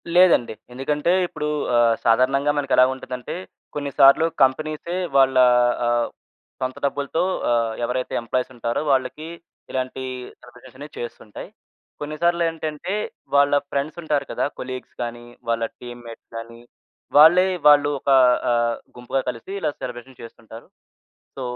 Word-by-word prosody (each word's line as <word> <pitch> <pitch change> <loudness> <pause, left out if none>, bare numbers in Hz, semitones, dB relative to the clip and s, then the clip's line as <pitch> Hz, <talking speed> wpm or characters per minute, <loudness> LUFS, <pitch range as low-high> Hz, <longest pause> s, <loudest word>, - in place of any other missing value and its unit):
లేదండి. 180 -11 +5 0.2
ఎందుకంటే, 145 +5 -1 0.2
ఇప్పుడు 150 -3 -5 0.3
ఆహ్, 120 -1 +4
సాధారణంగా 135 +5 +3
మనకెలా 135 -3 +4
ఉంటదంటే, 125 -1 -7 0.4
కొన్నిసార్లు 140 +1 +4 0.2
కంపెనీసె 155 +5 -1 0.2
వాళ్ళ 135 -1 +4 0.5
ఆహ్, 120 0 +1 0.5
సొంత 130 0 -3
డబ్బులతో 145 +4 -1 0.3
ఆహ్, 115 -1 +1
ఎవరైతే 125 +1 -3
ఎంప్లాయీసుంటారో 120 0 -2
వాళ్ళకి, 135 +4 -1 0.4
ఇలాంటి 130 0 -3 0.4
సెలబ్రేషనే 130 +3 -13
చేస్తుంటాయి. 115 -3 -8 0.5
కొన్నిసార్లేంటంటే, 165 +1 -1 0.4
వాళ్ళ 140 0 +4 0.2
ఫ్రెండ్స్ 145 +4 -3
ఉంటారు 150 -2 0
కదా, - - -1
కొలీగ్స్ 130 0 -7
గాని, 120 0 -7 0.2
వాళ్ళ 115 0 0 0.2
టీమ్‌మేట్స్ 120 -1 -11
గాని 115 +1 -9 0.6
వాళ్ళే 175 +5 +7 0.2
వాళ్ళు 145 0 +6
ఒక 140 - -4 0.4
ఆహ్, 120 -1 +1 0.2
గుంపుగా 125 +2 -2
కలిసి 125 +9 -7
ఇలా 155 - 0
సెలబ్రేషన్ 125 +1 -8
చేస్తుంటారు. 115 0 -12 0.7
సో, 135 - -5
130 Hz, 110 wpm, -22 LUFS, 120-150 Hz, 0.7 s, వాళ్ళే